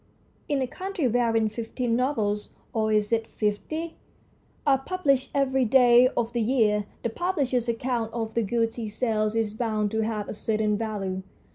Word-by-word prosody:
In 280 -3 +1
a - - -2
country 370 -2 -2
wherein 230 -2 +2
fifteen 230 +2 -2
novels 220 -5 0 0.2
or 220 -1 +1
is 210 0 +2
it 225 -1 +1
fifty? 310 +11 -3 0.7
are 275 -2 +4
published 275 -4 0
every 265 -1 +2
day 245 0 +6
of 235 0 0
the 240 - 0
year, 215 -3 +2 0.2
the 235 - 0
publisher's 265 -7 0
account 235 -1 -1
of 225 -1 -3
the 235 - +1
goods 230 +2 0
he 230 -2 -3
sells 215 -1 0
is 220 -2 0
bound 215 -2 -1
to 220 - 0
have 215 -2 -2
a - - -4
certain 215 0 0
value. 200 -4 -3
230 Hz, 165 wpm, -26 LUFS, 215-255 Hz, 0.7 s, day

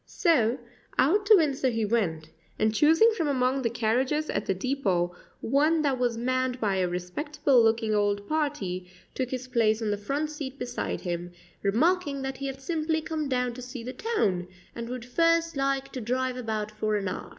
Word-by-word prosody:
So, 260 - +2 0.4
out 400 +10 +3
to 430 - +9
Windsor 280 -7 +2
he 225 -2 0
went, 180 -8 0 0.3
and 215 0 +2
choosing 325 - +5
from 330 -8 0
among 260 -1 +1
the 235 - +1
carriages 250 +7 0
at - - -2
the - - +2
depot 190 -7 0 0.3
one 305 +5 +2
that 270 -3 +1
was 240 -2 0
manned 255 +1 0
by 200 -4 +1
a 185 -1 +1
respectable 250 - +1
looking 225 -1 +2
old 205 -1 +1
party, 210 - -2 0.2
took 255 -2 -2
his 255 0 -4
place 225 -3 +2
on 220 -2 -1
the 205 - 0
front 280 +9 -2
seat 280 -3 -6
beside 245 -2 -3
him, 175 -1 -4 0.3
remarking 285 - +1
that 265 0 -4
he 275 - -4
had 270 0 -5
simply 315 +2 0
come 310 -2 -3
down 250 -2 0
to 255 - -8
see 250 -1 -7
the 255 +2 -5
town, 195 - 0 0.3
and 235 0 -6
would 250 -1 -5
first 330 +5 +2
like 275 0 -1
to 255 - -5
drive 255 +2 -1
about 220 -4 -3
for 215 0 -1
an 200 -2 -1
hour. - - -5
255 Hz, 190 wpm, -27 LUFS, 215-290 Hz, 0.4 s, to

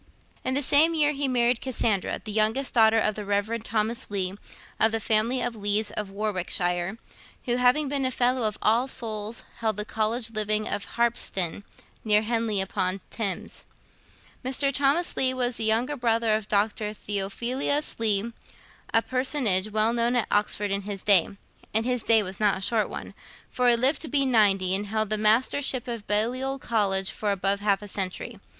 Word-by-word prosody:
In 260 - -1
the 285 - +1
same 310 +5 +5
year 300 -2 +3
he 280 -1 -1
married 245 -1 +2
Cassandra, 225 -6 -1
youngest 220 +5 0
daughter 225 -1 +5
of 215 -1 +1
the 210 - -6
Rev. 205 +3 -1
Thomas 225 +1 -2
Leigh, 190 -2 -2 0.5
of 220 - +4
the 225 - -1
family 225 +4 +1
of 245 -1 -2
Leighs 205 0 -1
of 210 -2 -4
Warwickshire, 185 -2 -2 0.5
who, 245 -1 0
having 250 +4 +3
been 275 0 -1
a 260 - +1
fellow 250 -1 +1
of 215 - -4
All 230 +4 +3
Souls, 220 -3 -4 0.2
held 220 -3 -1
the 210 - -3
College 220 +2 -2
living 215 0 0
of 200 - -3
Harpsden, 205 -6 0 0.4
near 210 -1 +3
Henley 225 -2 -1
upon 190 0 -2
Thames. 200 -5 -5 0.8
Mr. 270 +2 +1
Thomas 285 +6 +1
Leigh 260 -1 +2
was 245 -1 -1
a - - 0
younger 230 +6 +1
brother 230 -3 +1
of 215 -1 -1
Dr. 210 +1 0
Theophilus 235 +9 -2
Leigh, 220 0 0 0.6
a 225 - +3
personage 255 -7 +1
well 215 +2 +1
known 235 +1 +1
at 240 - +2
Oxford 205 0 0
in 200 0 0
his 200 -1 -7
day, 195 -5 +4 0.5
and 220 +1 +2
his 250 -1 0
day 225 -1 +3
was 185 -1 -6
not 210 -2 +2
a - - -8
short 215 +2 +1
one, - - -7 0.4
for 250 -1 +2
he 240 - +5
lived 260 +6 +2
to 320 - -3
be 280 -2 +1
ninety, 200 -7 +3
and 205 +2 -2
held 215 0 -2
the 215 - +1
Mastership 250 +4 +2
of 230 -3 -5
Balliol 250 +6 0
College 200 -6 0
for 210 -1 -2
above 195 +1 0
half 205 -1 0
a - - -8
century. 195 +3 -3
220 Hz, 180 wpm, -26 LUFS, 205-245 Hz, 0.8 s, same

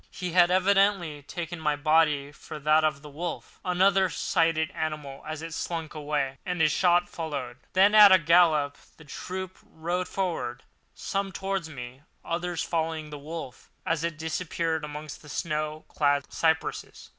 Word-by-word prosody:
He 180 -2 -5
had 175 0 +5
evidently 190 -4 +2
taken 170 +3 -6
my 150 -2 +1
body 150 -2 +2
for 150 - -9
that 155 +1 +3
of 150 -2 0
the - - -9
wolf. 170 +3 -6
Another 190 +1 +3
sighted 165 -2 +1
the - - -19
animal 150 -3 -4
as 155 0 -5
it 165 -1 -6
slunk 165 -2 -4
away, 145 -3 -2
and 180 -1 -3
a 160 -1 +5
shot 175 +3 +3
followed. 140 -7 -5 0.2
Then, 195 +3 +5
at 210 -2 +10
a 190 - +9
gallop, 160 -4 +3 0.2
the 150 - -15
troop 185 +5 -6
rode 175 +3 -3
forward—some 185 +4 -4
towards 195 -3 -3
me, 125 -2 -9 0.2
others 175 0 -2
following 160 -2 -2
the 150 - -7
wolf 150 -4 -8 0.2
as 165 -3 0
it 170 -2 -2
disappeared 160 0 -2
amongst 150 0 -7
the 150 - -14
snow 155 0 -3
clad 145 -1 0
cypresses. 160 -1 -1
160 Hz, 155 wpm, -27 LUFS, 150-180 Hz, 0.2 s, at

